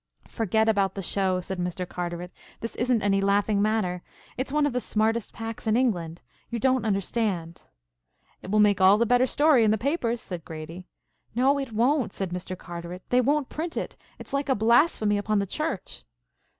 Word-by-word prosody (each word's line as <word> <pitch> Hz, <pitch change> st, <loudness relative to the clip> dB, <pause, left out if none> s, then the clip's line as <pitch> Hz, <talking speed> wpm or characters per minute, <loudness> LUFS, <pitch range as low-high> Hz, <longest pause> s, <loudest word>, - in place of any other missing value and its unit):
"Forget 220 Hz, 0 st, 0 dB
about 200 Hz, -3 st, +2 dB
the 195 Hz, -, -4 dB
show," 185 Hz, 0 st, 0 dB
said 190 Hz, +1 st, -5 dB
Mr. 180 Hz, 0 st, -3 dB
Carteret. 175 Hz, 0 st, -5 dB, 0.3 s
"This 230 Hz, -, -5 dB
isn't 240 Hz, -3 st, +1 dB
any 195 Hz, -1 st, +2 dB
laughing 200 Hz, +1 st, +2 dB
matter. 205 Hz, -4 st, 0 dB, 0.3 s
It's 255 Hz, +2 st, -3 dB
one 300 Hz, 0 st, +2 dB
of 290 Hz, -, 0 dB
the 250 Hz, -, -1 dB
smartest 220 Hz, 0 st, 0 dB
packs 225 Hz, 0 st, -7 dB
in 220 Hz, +1 st, +3 dB
England. 175 Hz, -10 st, -1 dB, 0.3 s
You 235 Hz, -, -3 dB
don't 260 Hz, +1 st, +1 dB
understand." 195 Hz, -4 st, -1 dB, 0.8 s
"It -, -, -9 dB
will 215 Hz, +2 st, +2 dB
make 205 Hz, -2 st, +4 dB
all 190 Hz, +2 st, +7 dB
the 235 Hz, -, +2 dB
better 245 Hz, +2 st, +3 dB
story 290 Hz, -5 st, +4 dB
in 215 Hz, -, +4 dB
the 215 Hz, -, +3 dB
papers," 240 Hz, -2 st, -1 dB
said 180 Hz, -6 st, -7 dB
Grady. 165 Hz, +4 st, -8 dB, 0.5 s
"No 270 Hz, +4 st, +3 dB
it 270 Hz, -4 st, -4 dB
won't," 250 Hz, +4 st, +1 dB
said 190 Hz, -3 st, -4 dB
Mr. 180 Hz, +1 st, -5 dB
Carteret. 175 Hz, +1 st, -8 dB
"They 250 Hz, +1 st, +4 dB
won't 285 Hz, +2 st, +1 dB
print 330 Hz, +2 st, -4 dB
it. -, -, -4 dB, 0.2 s
It's -, -, -12 dB
like 280 Hz, 0 st, -1 dB
a 265 Hz, -, +3 dB
blasphemy 220 Hz, -2 st, +3 dB
upon 215 Hz, +1 st, 0 dB
the 200 Hz, -, +1 dB
Church." 270 Hz, -, -4 dB
215 Hz, 190 wpm, -26 LUFS, 185-245 Hz, 0.8 s, all